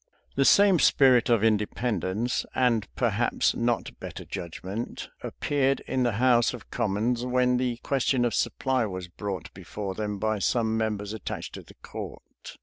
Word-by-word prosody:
The 135 - +3
same 200 0 +6
spirit 130 -6 +5
of 115 -3 +3
independence, 110 0 0
and 115 -5 +2
perhaps 120 -1 +1
not 120 -1 -1
better - - -7
judgment, 95 +5 -6
appeared 135 -2 0
in 130 - -2
the 120 -2 +2
house 120 +2 +3
of 115 - -14
commons 120 +1 0
when 125 0 +2
the 125 -2 -1
question 130 -2 +1
of 120 - 0
supply 125 +1 0
was 95 -2 -6
brought 95 +1 -6
before 95 +2 -6
them 105 0 -3
by 110 +1 -1
some 110 +2 +1
members 105 -2 -2
attached 110 - -6
to - - -7
the - - -17
court. - - -9
115 Hz, 150 wpm, -27 LUFS, 105-125 Hz, -, same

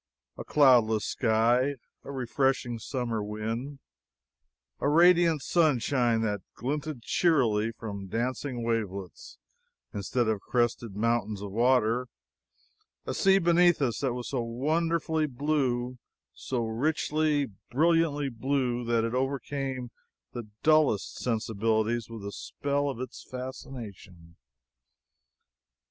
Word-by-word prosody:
A - - -7
cloudless 120 -7 +4
sky; 120 +4 +2 0.3
a - - -8
refreshing 130 -2 0
summer 120 -2 -3
wind; 115 +7 -4 1.0
a 145 - +1
radiant 170 -1 +5
sunshine 130 -7 +2
that 105 -3 -1
glinted 145 0 -4
cheerily 115 -12 +2
from 100 -4 -7
dancing 125 +3 -2
wavelets 105 -5 -4 0.6
instead 110 +3 -1
of 110 -3 0
crested 120 -3 -1
mountains 110 -2 0
of 100 - -6
water; 120 +1 +2 1.0
a - - -3
sea 195 0 +4
beneath 175 -1 +4
us 130 -5 0
that 130 -3 -1
was 125 -1 -5
so 130 -3 -1
wonderfully 155 +6 0
blue, 125 -3 -1 0.3
so 120 -3 -3
richly, 150 +4 0 0.2
brilliantly 150 0 +2
blue, 125 0 -1
that 115 -1 +1
it 115 +1 -2
overcame 135 -1 -2 0.4
the 120 -3 -6 0.2
dullest 155 -9 +3
sensibilities 110 0 0
with 115 -3 -8
the 100 - -5
spell 140 +5 -2
of 130 - -5
its 130 - -7
fascination. 110 -10 -9
125 Hz, 110 wpm, -28 LUFS, 115-145 Hz, 1.0 s, radiant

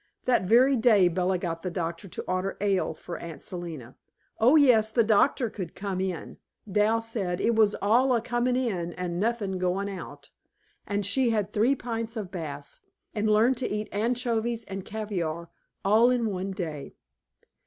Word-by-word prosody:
That 245 -7 +2
very 250 +7 +5
day 220 -6 +5
Bella 180 +2 0
got 165 -2 -4
the 185 - -3
doctor 170 +1 -4
to - - -6
order 185 +1 -2
ale 195 -5 0
for 170 +2 -7
Aunt 165 -2 -8
Selina 165 -9 -7 0.4
(oh, 245 +7 +5
yes; 245 -8 +5
the 230 +1 +3
doctor 230 +4 +3
could 185 -6 -7
come 195 -2 -3
in; 185 -4 -4 0.3
Dal 210 +3 +2
said 205 -6 -3
"it 235 - +2
was 215 -2 +3
all 240 +6 +4
a - - +2
coming 240 +2 0
in, 190 -10 -1
and 175 -1 -4
nothing 205 -3 -1
going 190 +2 -1
out") 190 - -9 0.6
and 205 -1 -1
she 245 +5 +2
had 210 -3 -1
three 235 +6 +3
pints 230 -2 -4
of 200 -4 -5
Bass, 145 -5 -7 0.3
and 215 0 0
learned 225 +4 +4
to 255 - -2
eat 210 +1 -3
anchovies 235 +1 -1
and 195 -1 -6
caviare 175 -7 -4 0.4
all 220 +5 +5
in 235 -4 +1
one 190 0 -3
day. 160 -7 -6
205 Hz, 170 wpm, -27 LUFS, 180-230 Hz, 0.6 s, very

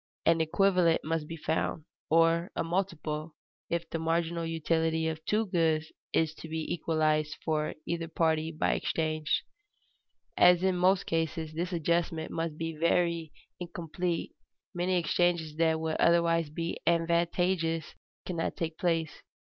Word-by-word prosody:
An 165 0 +4
equivalent 180 0 +3
must 160 -1 -2
be 165 - -6
found, 155 0 -1 0.2
or 165 +2 +3
a - - 0
multiple, 165 -3 -2 0.3
if 170 0 -1
the 165 - -2
marginal 165 +1 0
utility 160 0 0
of 160 0 -4
two 215 +1 +1
goods 160 -4 +1 0.2
is 160 -1 +1
to 160 - -10
be 160 0 -2
equalized 155 -2 0
for 155 -1 0
either 170 -1 -2
party 160 -1 +1
by 155 - +1
exchange. 155 -1 -1 0.9
As 180 0 +6
in 190 -1 +2
most 185 +2 +3
cases 160 -1 -2
this 175 +3 -2
adjustment 170 -1 0
must 165 -2 -3
be 165 0 -3
very 170 0 +1 0.3
incomplete, 175 0 -3 0.4
many 180 +1 +1
exchanges 170 -2 +1
that 160 -1 +3 0.2
otherwise 170 -1 +4
would 150 +1 -15
be 170 0 -3
advantageous 170 0 +1 0.3
cannot 170 -3 -2
take 165 -1 -4
place. 165 -3 0
165 Hz, 135 wpm, -30 LUFS, 160-170 Hz, 0.9 s, As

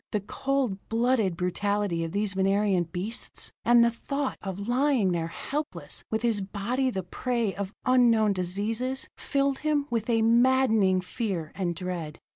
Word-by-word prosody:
The 210 - +1
cold 260 -1 -1
blooded 225 -6 +2
brutality 190 -1 0
of 165 - -4
these 200 0 0
Venerian 195 -1 +2
beasts, 185 +8 -5
and 240 0 +6
the 235 - +2
thought 275 +4 -3
of 200 +1 -5
lying 250 -5 +2
there 165 -2 -1
helpless 175 - -5
with 220 +1 -1
his 225 -4 +2
body 215 +7 -1
the 190 -6 -3
prey 235 +2 -1
of 200 -1 -4
unknown 235 -5 +4
diseases, 215 +8 -2
filled 275 -1 0
him 300 -2 +1
with 230 -1 -1
a 225 -1 +3
maddening 230 -5 +4
fear 180 -5 -3
and 175 -3 -2
dread. 170 -3 -5
210 Hz, 150 wpm, -27 LUFS, 190-245 Hz, -, and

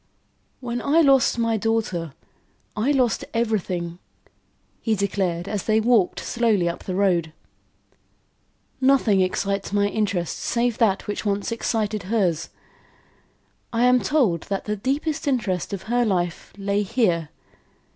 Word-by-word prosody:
"When 240 -1 -3
I 310 +4 +3
lost 270 -5 +4
my 230 -1 +1
daughter, 205 -8 -1 0.6
I 215 +6 0
lost 255 -5 +2
everything," 180 -7 -1 0.8
he 220 -2 +1
declared, 185 -3 -1
as 205 -3 -3
they 220 0 +3
walked 220 -4 +2
slowly 220 -7 +1
up 170 - -4
the 185 - -3
road. 180 -5 +1 1.5
"Nothing 260 -7 +4
excites 195 +2 -1
my 205 0 +2
interest, 200 -6 -1
save 240 -1 0
that 205 -5 +2
which 205 - -4
once 205 +1 -1
excited 220 -2 -1
hers. 185 -8 0 1.2
I 235 0 +1
am 250 0 +5
told 205 - +2
that 195 -1 -2
the 210 - -1
deepest 280 +8 -2
interest 215 -11 -1
of 200 -2 -5
her 240 +2 +1
life 175 -5 -1
lay 200 +1 0
here. 190 - 0
210 Hz, 130 wpm, -23 LUFS, 185-235 Hz, 1.5 s, am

